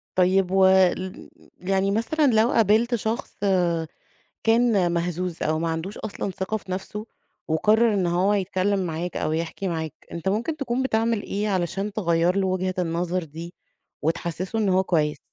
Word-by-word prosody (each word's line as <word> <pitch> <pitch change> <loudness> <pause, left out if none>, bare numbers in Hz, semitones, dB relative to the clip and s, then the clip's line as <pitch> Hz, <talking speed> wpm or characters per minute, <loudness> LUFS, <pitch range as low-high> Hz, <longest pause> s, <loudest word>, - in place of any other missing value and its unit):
طيب 185 0 +3
وال 190 -1 +3 0.3
يعني 195 +1 0
مثلًا 230 +9 +1
لو 220 +2 +4
قابلت 225 +3 +3
شخص 220 +2 -3 1.1
كان 225 -6 +3
مهزوز 175 0 -2
أو 155 +1 0
ما 165 0 -1
عندوش 165 +5 -4
أصلًا 200 -2 -4
ثقة 190 +4 -3
في 190 -3 -11
نَفْسه، 210 +3 -5 0.4
وقرر 215 +8 +3
إن 190 -3 +1
هو 185 +4 +2
يتكلم 195 0 0
معاك 170 +1 -3
أو - - -1
يحكي 165 +4 -3
معاك، 160 -3 -3 0.2
أنت 170 +2 -2
ممكن 235 +11 -1
تكُون 255 -2 -1
بتعمل 225 -3 +1
إيه 205 +2 -2
علشان 190 +2 -1
تغيّر 175 -3 +1
له 195 -1 +1
وجهة 185 0 -1
النظر 175 +1 -1
دي 165 +3 -9 0.5
وتحسسه 170 +6 -2
إن 205 -3 +1
هو 185 +1 +3
كويس؟ 150 -5 0
190 Hz, 155 wpm, -24 LUFS, 170-210 Hz, 1.1 s, لو